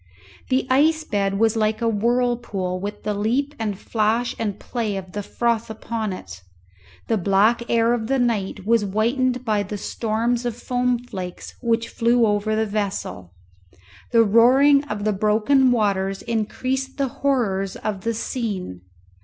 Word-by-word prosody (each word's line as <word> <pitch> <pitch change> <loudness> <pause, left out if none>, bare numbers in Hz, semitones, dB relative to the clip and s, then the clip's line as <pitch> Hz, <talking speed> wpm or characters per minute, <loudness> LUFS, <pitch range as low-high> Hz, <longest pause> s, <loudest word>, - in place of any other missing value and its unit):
The 260 0 +2
ice 315 +5 +3
bed 195 -7 -1
was 225 +1 +2
like 215 -1 +1
a 230 - 0
whirlpool 230 -4 0
with 205 +2 -6
the 210 - -1
leap 245 +8 0
and 210 -3 -2
flash 225 +3 0
and 210 -3 -2
play 220 -5 -3
of 185 -1 -7
the 205 - -4
froth 230 +2 -1
upon 220 -1 -4
it. 95 - -8 0.6
The 225 -2 0
black 200 +5 +3
air 230 0 +3
of 225 -2 -2
the 270 +2 +1
night 220 -6 -1
was 230 +1 +3
whitened 245 +5 0
by 215 -2 +1
the 205 +1 -5
storms 230 +3 -1
of 240 -2 -3
foam 250 0 0
flakes 185 -7 -7
which 230 -1 0
flew 235 0 +2
over 210 +1 +1
the 220 0 +1
vessel. 200 - -4 0.8
The 230 -1 +6
roaring 260 +6 +5
of 210 -7 -4
the 215 0 +1
broken 215 +7 +3
waters 195 -4 0
increased 255 +4 -2
the 275 -1 +1
horrors 205 -9 0
of 210 -3 -4
the 230 +2 -1
scene. 205 - -4
225 Hz, 155 wpm, -22 LUFS, 205-245 Hz, 0.8 s, The